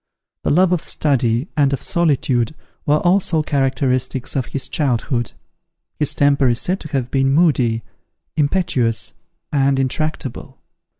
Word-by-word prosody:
The - - 0
love 180 +3 +4
of 180 -3 +1
study 125 -2 0
and 140 -3 +2
of 140 - -2
solitude 140 -6 +1 0.3
were 150 +1 +4
also 175 -3 +2
characteristics 130 -2 -1
of 130 -3 -1
his 135 - -3
childhood. 125 -4 -1 0.7
His 150 - +1
temper 140 -2 +3
is 120 -1 +2
said 185 +2 0
to - - -8
have 135 -4 -2
been 135 -1 +2
moody, 130 -8 +2 0.5
impetuous, 140 - +1 0.4
and 140 -1 +2
intractable. 135 0 -3
140 Hz, 130 wpm, -19 LUFS, 125-155 Hz, 0.7 s, love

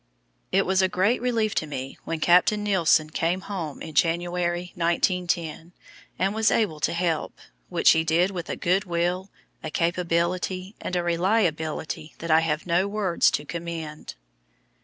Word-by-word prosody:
It 195 +1 +3
was 190 +1 +2
a 190 - +2
great 200 +8 +1
relief 230 -4 0
to 155 - -1
me 135 -2 -6
when 165 -1 -3
Captain 180 +6 +4
Nilsen 165 -6 +3
came 170 +4 0
home 170 -8 -5
in 160 - -8
January, 175 +2 0
1910, 170 -1 -1 0.4
and 195 +2 +1
was 220 0 +3
able 185 -9 +1
to - - +1
help 170 -2 -1 0.3
which 175 -2 +5
he 160 - +3
did 170 +4 +2
with 175 -3 -6
a - - -2
good 190 +4 +1
will, 175 +2 -1 0.3
a 155 - -3
capability, 175 +3 -1
and 185 - -3
a 175 - 0
reliability 170 -4 -1
that 165 0 -4
I 160 - +7
have 160 -1 -1
no 180 +2 +2
words 200 -4 +2
to 145 - -2
commend. 165 -2 -6
175 Hz, 160 wpm, -25 LUFS, 165-185 Hz, 0.4 s, I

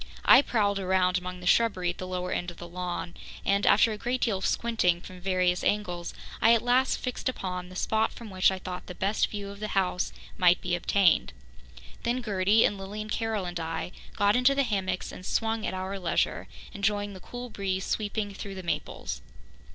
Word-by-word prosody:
I - - +9
prowled 205 -7 +1
around 185 -1 +2
among 180 0 -7
the - - -8
shrubbery 185 -3 +3
at - - -14
the 185 - -4
lower 180 0 -3
end 175 - -1
of 175 - -11
the 175 - -8
lawn 175 0 -4 0.3
and, 200 +1 +2
after 220 +2 +6
a 210 - -5
great 250 +3 -1
deal 205 -5 +1
of - - 0
squinting 210 -7 +1
from 180 +1 -11
various 180 -1 +1
angles, 180 -5 -1 0.3
I 230 - +7
at 230 - 0
last 250 +2 +3
fixed 250 +1 -2
upon 180 -6 -4
the 185 - -11
spot 220 +3 +1
from 230 -3 -10
which 185 -1 +4
I 190 - -2
thought 180 -1 -7
the 180 - -7
best 200 +4 +1
view 205 -1 -6
of 200 - -11
the 215 - -3
house 180 -1 +1 0.3
might 180 -1 +5
be 180 - -3
obtained. 190 +1 +3 0.7
Then 240 +2 -1
Gertie 205 +1 +3
and 200 - 0
Lilian 210 +2 -6
Carroll 220 -4 -1
and 175 -1 -4
I 165 +2 -3 0.2
got 205 +1 +3
into 250 +2 +4
the 280 - +3
hammocks 190 -6 -2
and - - -10
swung 225 +3 0
at - - -2
our 190 +1 -4
leisure, 175 -2 0 0.3
enjoying 205 0 0
the 190 - -9
cool 245 +5 -8
breeze 190 -2 -2
sweeping 205 -1 -2
through 195 0 -7
the 185 - -7
maples. 170 - -3
195 Hz, 205 wpm, -28 LUFS, 180-215 Hz, 0.7 s, I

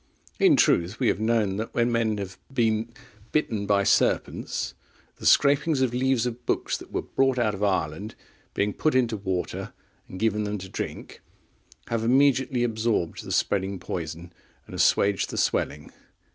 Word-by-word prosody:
In - - +6
truth, 90 +6 +2
we 125 - +3
have - - 0
known 110 -3 +1
that 110 +1 -5
when 120 0 +2
men 115 -2 +1
have 95 -2 -6
been 115 -3 0 0.4
bitten 110 -9 0
by 100 -1 +3
serpents, - - 0 0.4
the - - -2
scrapings 145 +1 +4
of 125 -2 +1
leaves 130 -1 +1
of 125 0 -4
books - - 0
that - - -13
were - - -2
brought 135 -1 +1
out 115 -3 +1
of 100 - -7
Ireland, 95 0 -1 0.4
being 100 0 0
put 155 -4 0
into 120 -3 +2
water, 95 -3 -3 0.4
and 95 - -8
given 105 -1 +1
them 105 0 -2
to 95 -1 -9
drink, - - -6 0.7
have 115 -1 -1
immediately 130 0 +3
absorbed 110 -7 -1
the - - -7
spreading 100 0 0
poison, 85 0 -6 0.3
and - - -13
assuaged 100 -1 +2
the - - -5
swelling. 75 -1 -1
110 Hz, 160 wpm, -26 LUFS, 100-120 Hz, 0.7 s, In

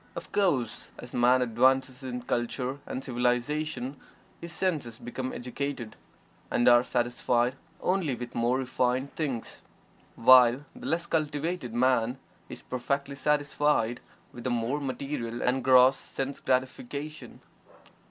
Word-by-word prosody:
Of - - -7
course, 145 - 0
as 120 - -10
Man 125 +1 +4
advances 130 +2 +2
in 125 -2 -5
"culture" 125 +3 -2
and 130 - -4
"civilization," 125 +2 -1 0.4
his 170 0 -7
senses 155 -12 -1
become 125 +2 -5
educated, 125 -1 -5 0.5
and 120 - +2
are 120 0 +7
satisfied 120 0 0 0.3
only 180 -8 +1
with 120 0 -7
more 120 +2 +1
refined 130 +1 -1
things, 135 -8 -3 0.5
while 125 +2 +6
the - - -8
less 170 +1 0
cultivated 155 -4 -2
man 125 0 +2 0.3
is - - -9
perfectly 140 +2 -2
satisfied 145 -4 +1 0.3
with 120 - -9
the 130 - -1
more 120 +4 -1
material 130 -3 -4
and 125 +1 +1
gross 130 +1 +6
sense 135 +1 -4
gratifications. 135 +3 -3
130 Hz, 125 wpm, -28 LUFS, 120-140 Hz, 0.5 s, are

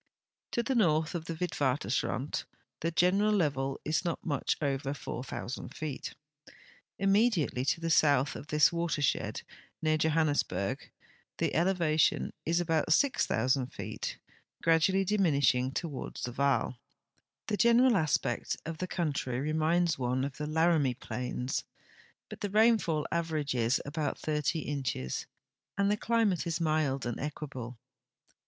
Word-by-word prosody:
To 235 - +1
the 265 - 0
north 160 -9 +2
of 165 -2 -4
the 165 - -4
Witwatemrand 140 - -1 0.3
the 165 - 0
general 185 +5 +3
level 140 -8 0
is 155 +3 0
not 170 -3 -3
much 145 -5 0
over 140 -1 -1
4,000 125 -1 -6
feet. 150 -4 -5 0.8
Immediately 195 - +2
to 140 - +1
the 165 0 -1
south 145 -3 +4
of 145 - -8
this 150 +2 +4
watershed, 170 -4 -1 0.4
near 155 -1 +1
Johannesburg, 155 -2 0 0.5
the - - 0
elevation 170 -3 +2
is 170 +1 +2
about 165 -2 0
6,000 135 - +2
feet, - - -6 0.5
gradually 170 +4 +3
diminishing 140 - +2
toward 145 -1 -5
the 120 - -4
Vaal, 130 -1 0 0.7
The 210 - -1
general 235 +2 +5
aspect 145 -8 0
of 165 -1 -5
the 185 - -2
country 140 -8 -2
reminds 160 +3 +1
one 130 +1 0
of 140 -1 -6
the 150 - -3
Laramie 155 -4 +2
plains, 125 0 -3 0.6
but - - -10
the 205 - -2
rainfall 210 -8 +3
averages 145 -7 0
about 150 +1 -3
80 155 +1 0
inches, 125 - -3 0.5
and 200 0 +2
the - - +3
climate 215 -5 +1
is 165 0 -1
mild 155 -5 0
and 120 -1 -3
equable. 135 -5 -6
155 Hz, 130 wpm, -30 LUFS, 135-175 Hz, 0.8 s, general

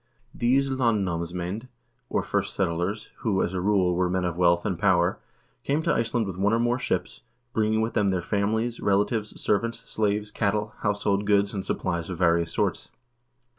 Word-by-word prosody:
1 - - -15
These 135 +3 +3
land 115 -6 +2
namsmcend, 90 +6 -3 0.4
or - - 0
first - - -2
settlers, 95 +3 -1
who, 100 -5 0
as 90 - -2
a 90 - -1
rule, 95 -2 +2
were 90 +1 +1
men 90 0 0
of 90 -2 -2
wealth 85 0 +3
and 95 -5 -1
power, 95 -3 +3 0.4
came 150 +3 0
to - - +2
Iceland 115 0 0
with 95 -3 -5
one 100 +2 +2
or 115 - +3
more 120 +2 +1
ships, - - -2 0.3
bringing 110 -2 +2
with 110 +1 -1
them 105 -2 +2
their 90 -2 0
families, 110 +5 0
relatives, 105 +2 0
servants, 115 +3 -1
slaves, 105 -1 -1
cattle, 105 0 -1
household 105 -1 0
goods, 100 0 +3
and 100 -2 -3
supplies 85 -3 -2
of 90 - -4
various 85 -1 +2
sorts. - - -1
100 Hz, 180 wpm, -26 LUFS, 90-110 Hz, 0.4 s, These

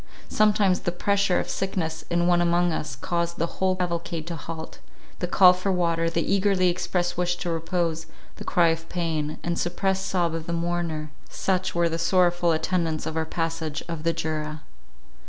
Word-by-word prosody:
Sometimes 205 -3 +3
the 175 - -2
pressure 200 +1 +1
of - - -3
sickness 165 -4 -2
in 175 0 +2
one 175 0 +4
among 175 0 +2
us, 145 -3 -3
caused 170 +6 -2
the 165 - +1 0.2
whole 190 -1 +3
cavalcade 170 -3 -3
to 170 0 -4
halt; 160 0 -7 0.4
the 180 - -1
call 180 0 +7
for 185 +2 -1
water, 170 -2 +1
the 165 0 0
eagerly 195 -2 +3
expressed 175 0 -1
wish 175 0 +1
to 175 -1 -3
repose; 165 -1 -1 0.3
the - - -7
cry 170 -2 +3
of 165 0 -3
pain, 160 -4 -2
and 170 0 -1
suppressed 190 +2 0
sob 175 -4 +1
of 165 -1 -4
the 170 - -2
mourner—such 170 +2 -2
were 170 0 +3
the 165 0 -2
sorrowful 175 0 +3
attendants 160 -1 0
of 160 - -4
our 160 0 0
passage 160 -2 -3
of 165 -2 -4
the 165 +1 +1
Jura. 155 -1 -3
170 Hz, 175 wpm, -25 LUFS, 165-180 Hz, 0.4 s, call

